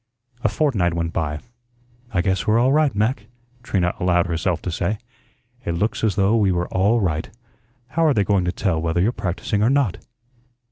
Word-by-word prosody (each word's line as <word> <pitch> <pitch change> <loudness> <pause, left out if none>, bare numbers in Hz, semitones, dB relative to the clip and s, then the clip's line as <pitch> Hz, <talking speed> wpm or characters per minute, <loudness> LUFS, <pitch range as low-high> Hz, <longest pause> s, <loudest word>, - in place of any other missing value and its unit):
A 110 - +3
fortnight 105 - +1
went 85 -1 -2
by. 75 -2 -2 0.7
"I 90 - +1
guess 95 +3 0
we're 110 +1 +4
all 125 +3 +3
right, 150 -4 +2
Mac," 105 0 0 0.3
Trina 90 -6 0
allowed 90 -1 +2
herself 85 0 -1
to 90 - -3
say. 85 +5 -1 0.7
"It 85 - -2
looks 105 +7 -1
as 110 -4 +2
though 100 +2 +3
we 100 -4 +3
were 90 -1 -1
all 100 +6 +2
right. 80 -5 -1 0.6
How 165 +6 +1
are 150 - +4
they 100 - +3
going 100 -2 +1
to 90 - 0
tell 85 -4 -1
whether 80 +1 0
you're 100 +7 +3
practising 100 0 -2
or 110 - +4
not?" 135 -8 +1
95 Hz, 190 wpm, -22 LUFS, 85-110 Hz, 0.7 s, we're